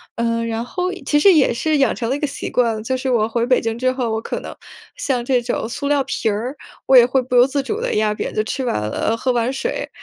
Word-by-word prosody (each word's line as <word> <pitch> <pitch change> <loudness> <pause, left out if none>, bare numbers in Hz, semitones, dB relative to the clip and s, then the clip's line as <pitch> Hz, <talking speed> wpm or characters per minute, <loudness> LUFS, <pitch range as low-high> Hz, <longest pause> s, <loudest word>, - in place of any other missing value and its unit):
呃， 230 0 -1
然 230 0 -2
后 360 +8 -3 0.2
其 295 - +3
实 380 +5 +6
也 305 -5 +4
是 310 +6 0
养 270 - +2
成 230 - -3
了 265 - +1
一 - - -4
个 295 - -1
习 280 - -6
惯， 230 -3 +1
就 260 +3 -1
是 260 +1 -3
我 225 -4 +2
回 230 +1 -1
北 255 - +4
京 225 0 -2
之 255 +1 +2
后， 250 -3 -2
我 220 0 -2
可 - - -4
能 - - -8 0.4
像 250 -4 -2
这 250 -1 +2
种 235 - -2
塑 280 +4 -4
料 285 -1 +2
瓶 220 - -1
儿， 235 +7 -3 0.3
我 265 - +4
也 245 - +10
会 255 +2 +2
不 250 0 -3
由 245 +1 +6
自 275 0 -1
主 430 +10 -3
地 - - -1
压 215 0 +2
扁。 - - -4
就 215 - 0
吃 260 +5 -3
完 245 - -1
了 105 0 -3 0.2
呃， 225 - 0
喝 255 +2 0
完 240 0 0
水， 370 - -3
250 Hz, 300 characters per minute, -20 LUFS, 230-275 Hz, 0.4 s, 也